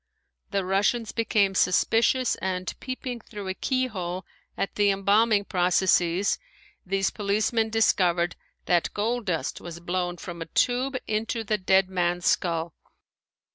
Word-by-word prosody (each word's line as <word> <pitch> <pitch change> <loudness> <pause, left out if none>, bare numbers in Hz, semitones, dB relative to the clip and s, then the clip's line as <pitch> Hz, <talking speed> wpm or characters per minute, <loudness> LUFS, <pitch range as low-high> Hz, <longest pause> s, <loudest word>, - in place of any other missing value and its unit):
The 195 -2 -1
Russians 205 +4 +1
became 210 -4 +1
suspicious 225 +7 +3
and 185 -1 -3
peeping 255 -1 -5
through 210 -3 -9
a - - -1
keyhole 190 -8 -2 0.3
at 195 - -2
the 205 -1 +3
embalming 200 +2 +3
processes 180 0 +2 0.4
these 195 +1 0
policemen 215 +2 0
discovered 180 -6 +2 0.3
that 175 -1 +2
gold 230 +2 -1
dust 165 -7 -2
was 170 -1 -8
blown 175 0 -2
from 170 -2 -8
a 165 - -5
tube 255 +7 +1
into 225 +2 -2
the 215 0 -1
dead 190 0 +3
man's 175 -1 -1
skull. 165 -2 +1
195 Hz, 130 wpm, -26 LUFS, 180-220 Hz, 0.4 s, suspicious